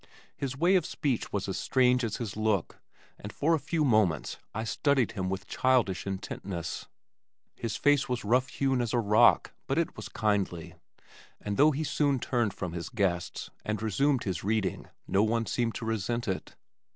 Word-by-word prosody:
His 130 Hz, -2 st, -4 dB
way 175 Hz, +5 st, +3 dB
of 185 Hz, -3 st, +4 dB
speech 140 Hz, -7 st, -2 dB
was 100 Hz, -1 st, -2 dB
as 95 Hz, -, -2 dB
strange 125 Hz, -1 st, +3 dB
as 110 Hz, -3 st, -2 dB
his 110 Hz, -4 st, -5 dB
look 110 Hz, -4 st, -1 dB, 0.4 s
and 105 Hz, -, -7 dB
for 160 Hz, +3 st, +1 dB
a 160 Hz, -, +2 dB
few 155 Hz, +2 st, 0 dB
moments 105 Hz, -, +2 dB
I 110 Hz, -, -3 dB
studied 135 Hz, +2 st, +1 dB
him 95 Hz, -4 st, -3 dB
with 95 Hz, 0 st, -3 dB
childish 120 Hz, -8 st, +1 dB
intentness. 95 Hz, -2 st, -5 dB, 0.7 s
His 115 Hz, -3 st, -3 dB
face 145 Hz, -1 st, +3 dB
was 125 Hz, -3 st, -2 dB
rough 125 Hz, +4 st, +3 dB
hewn 135 Hz, -1 st, 0 dB
as 120 Hz, -2 st, -2 dB
a 120 Hz, -, +3 dB
rock 105 Hz, -1 st, +4 dB
but -, -, 0 dB
it -, -, 0 dB
was -, -, -7 dB
kindly, 95 Hz, -6 st, -1 dB, 0.7 s
and 100 Hz, -1 st, -3 dB
though 145 Hz, +6 st, +6 dB
he 155 Hz, +1 st, -1 dB
soon 145 Hz, -1 st, +1 dB
turned 120 Hz, -5 st, 0 dB
from 90 Hz, -4 st, -4 dB
his 85 Hz, -1 st, -5 dB
guests 95 Hz, -7 st, -2 dB
and 105 Hz, -1 st, -2 dB
resumed 125 Hz, +6 st, +1 dB
his 90 Hz, -4 st, -3 dB
reading 105 Hz, -1 st, -1 dB, 0.2 s
no 95 Hz, -, +3 dB
one 115 Hz, +1 st, +1 dB
seemed 115 Hz, -1 st, -1 dB
to -, -, -4 dB
resent 115 Hz, +2 st, -1 dB
it. 95 Hz, -1 st, -4 dB
110 Hz, 180 wpm, -29 LUFS, 100-130 Hz, 0.7 s, though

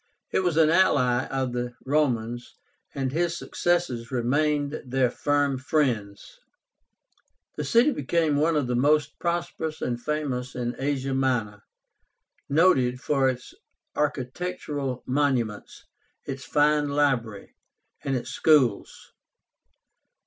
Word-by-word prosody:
He -, -, +2 dB
was 175 Hz, -4 st, 0 dB
an 160 Hz, -1 st, +5 dB
ally 130 Hz, -8 st, +3 dB
of 130 Hz, -2 st, -2 dB
the 120 Hz, 0 st, -3 dB
Romans, 120 Hz, -5 st, -1 dB, 0.4 s
and 135 Hz, -2 st, -1 dB
his 170 Hz, +3 st, 0 dB
successors 170 Hz, -10 st, -1 dB
remained 145 Hz, +4 st, 0 dB
their 130 Hz, -1 st, +1 dB
firm 145 Hz, -2 st, 0 dB
friends. 120 Hz, -8 st, -2 dB, 1.2 s
The 150 Hz, -, -3 dB
city 235 Hz, -, +4 dB
became 160 Hz, -, 0 dB
one 155 Hz, +3 st, +2 dB
of 145 Hz, -3 st, +1 dB
the 125 Hz, 0 st, -1 dB
most 150 Hz, +3 st, +2 dB
prosperous 170 Hz, -2 st, -3 dB
and 120 Hz, -1 st, -3 dB
famous 135 Hz, -4 st, -3 dB
in 120 Hz, -1 st, -3 dB
Asia 135 Hz, -1 st, -1 dB
Minor, 120 Hz, -6 st, 0 dB, 0.9 s
noted 140 Hz, -6 st, +3 dB
for 135 Hz, -1 st, +2 dB
its 130 Hz, 0 st, -6 dB, 0.4 s
architectural 145 Hz, -1 st, -3 dB
monuments, 125 Hz, -6 st, -1 dB, 0.4 s
its 135 Hz, 0 st, -6 dB
fine 150 Hz, 0 st, +2 dB
library, 130 Hz, -8 st, -1 dB, 0.5 s
and 135 Hz, -, -1 dB
its 120 Hz, -, -4 dB
schools. 135 Hz, -10 st, +1 dB
135 Hz, 110 wpm, -26 LUFS, 125-150 Hz, 1.2 s, an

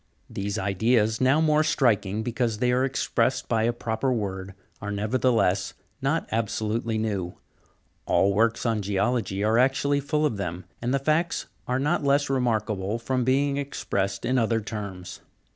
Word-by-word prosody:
These 100 Hz, +1 st, -3 dB
ideas, 110 Hz, +3 st, +1 dB
now 130 Hz, +4 st, +4 dB
more 155 Hz, -1 st, +3 dB
striking, 110 Hz, -8 st, +1 dB
because 120 Hz, -1 st, -1 dB
they 125 Hz, +2 st, +1 dB
are 125 Hz, +1 st, +2 dB
expressed 130 Hz, -1 st, 0 dB
by 115 Hz, -2 st, +1 dB
a 120 Hz, -, +2 dB
proper 120 Hz, +2 st, -2 dB
word, 95 Hz, -4 st, -3 dB, 0.3 s
are 100 Hz, -, -4 dB
nevertheless 110 Hz, -1 st, +1 dB, 0.3 s
not 140 Hz, +5 st, 0 dB
absolutely 110 Hz, 0 st, -1 dB
new; 100 Hz, -5 st, -2 dB, 0.7 s
all 100 Hz, +1 st, +3 dB
works 115 Hz, +3 st, +1 dB
on 115 Hz, -2 st, +1 dB
geology 100 Hz, 0 st, 0 dB
are 110 Hz, +2 st, +3 dB
actually 135 Hz, +2 st, +2 dB
full 150 Hz, +2 st, 0 dB
of 115 Hz, -8 st, 0 dB
them, 90 Hz, -2 st, -4 dB, 0.2 s
and 120 Hz, +1 st, -1 dB
the 140 Hz, -, +3 dB
facts 155 Hz, +5 st, 0 dB, 0.2 s
are 125 Hz, -, +1 dB
not 145 Hz, +2 st, 0 dB
less 140 Hz, 0 st, +2 dB
remarkable 110 Hz, -5 st, 0 dB
from 125 Hz, +2 st, -1 dB
being 140 Hz, +3 st, +2 dB
expressed 100 Hz, -8 st, -2 dB
in 125 Hz, +1 st, +2 dB
other 115 Hz, 0 st, +1 dB
terms. 100 Hz, -4 st, -6 dB
115 Hz, 155 wpm, -26 LUFS, 105-130 Hz, 0.7 s, now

